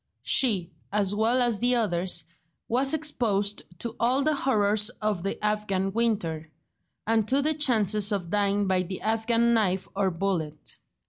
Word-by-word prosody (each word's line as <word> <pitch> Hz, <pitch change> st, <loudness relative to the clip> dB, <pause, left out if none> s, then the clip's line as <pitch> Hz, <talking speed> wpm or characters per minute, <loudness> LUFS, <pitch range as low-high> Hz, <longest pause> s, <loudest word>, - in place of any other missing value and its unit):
She, 195 Hz, -9 st, +1 dB, 0.2 s
as 205 Hz, -1 st, +1 dB
well 230 Hz, +4 st, +2 dB
as 235 Hz, -4 st, 0 dB
the 245 Hz, +1 st, +3 dB
others, 175 Hz, -6 st, 0 dB, 0.4 s
was 265 Hz, +4 st, +2 dB
exposed 210 Hz, -10 st, 0 dB, 0.2 s
to 235 Hz, -1 st, -5 dB
all 255 Hz, +4 st, +2 dB
the 310 Hz, +1 st, +2 dB
horrors 215 Hz, -6 st, +1 dB
of 210 Hz, -4 st, -1 dB
the 195 Hz, +2 st, -3 dB
Afghan 195 Hz, -2 st, -1 dB
winter, 175 Hz, -9 st, -1 dB, 0.6 s
and 220 Hz, -1 st, +1 dB
to 275 Hz, +3 st, +2 dB
the 310 Hz, +2 st, +3 dB
chances 215 Hz, -8 st, +2 dB
of 180 Hz, -4 st, -3 dB
dying 205 Hz, 0 st, +1 dB
by 190 Hz, -1 st, +1 dB
the 185 Hz, +1 st, -6 dB
Afghan 230 Hz, +2 st, +1 dB
knife 190 Hz, -4 st, +1 dB
or 195 Hz, -1 st, +1 dB
bullet. 165 Hz, -4 st, -4 dB
210 Hz, 150 wpm, -26 LUFS, 195-235 Hz, 0.6 s, the